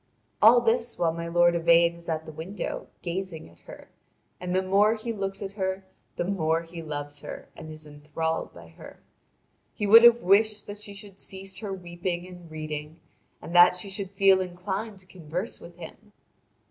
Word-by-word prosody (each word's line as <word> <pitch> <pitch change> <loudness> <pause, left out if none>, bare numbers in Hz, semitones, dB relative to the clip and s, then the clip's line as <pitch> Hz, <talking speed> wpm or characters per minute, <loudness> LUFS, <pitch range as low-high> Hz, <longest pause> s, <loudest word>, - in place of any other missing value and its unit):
All 235 +3 +8
this 235 +1 0
while 165 -2 +1
my 170 0 -5
lord 175 0 +4
Yvain 170 0 +4
is 170 0 -11
at 160 -1 -2
the - - -8
window 165 +7 -6 0.2
gazing 175 -2 -4
at 85 - -22
her, - - -11 0.5
and 180 0 -3
the 190 - +2
more 200 +4 +3
he 230 +1 -4
looks 195 -1 -4
at 195 - -5
her 190 -1 -3 0.3
the - - -1
more 165 -3 0
he 165 0 -9
loves 145 -2 -6
her - - -9
and 155 - -10
is 155 0 -10
enthralled 150 +2 -4
by 85 -1 -14
her. 80 - -13 0.8
He 210 - -2
would 225 +3 +9
have 235 0 +7
wished 210 +3 +3
that 205 0 -8
she 205 -1 -9
should 200 -1 -11
cease 190 0 -8
her 205 -1 -5
weeping 175 -1 -4
and 180 -2 -12
reading, 155 0 -6 0.4
and 170 - -8
that 175 0 +7
she 195 +2 -5
should 195 -1 -4
feel 195 -1 +4
inclined 190 +4 -4
to 190 - -17
converse 180 +3 -5
with 170 - -12
him. 210 +4 -12
180 Hz, 185 wpm, -27 LUFS, 165-200 Hz, 0.8 s, would